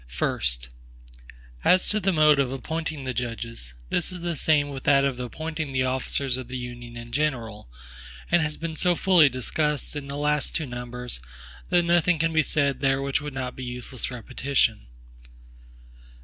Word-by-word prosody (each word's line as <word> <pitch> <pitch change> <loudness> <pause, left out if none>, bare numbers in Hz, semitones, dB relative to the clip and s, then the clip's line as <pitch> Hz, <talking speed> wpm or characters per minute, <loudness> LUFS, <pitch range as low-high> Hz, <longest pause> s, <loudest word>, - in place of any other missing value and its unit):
First. - - 0 0.9
As 185 - +4
to 215 - +2
the 195 -1 +2
mode 150 -3 +5
of 135 -2 +2
appointing 155 +1 -3
the 130 -1 -2
judges; 115 - -4 0.2
this 175 - +1
is 180 -1 -7
the 170 -1 -2
same 145 0 +2
with 135 -2 -6
that 140 -1 +5
of 130 -2 -1
appointing 155 +4 -4
the 130 -1 +2
officers 130 0 0
of 130 -2 -6
the 130 +1 -4
Union 120 -1 -7
in 120 0 -9
general, 120 - -2 0.6
and 175 0 +5
has 150 -1 -1
been 165 -1 -4
so 175 +3 +2
fully 175 -5 +6
discussed 150 +4 -1
in 145 -1 -5
the 140 - -5
two 145 - -3
last 150 +1 +1
numbers, 125 - -5 0.5
that 175 0 +4
nothing 170 0 +3
can 165 +1 +1
be 160 - +5
said 140 -3 0
here 135 0 +3
which 140 +1 0
would 145 -2 -6
not 130 -1 -3
be 130 - -7
useless 125 0 -4
repetition. 125 - 0
140 Hz, 175 wpm, -26 LUFS, 125-155 Hz, 0.9 s, fully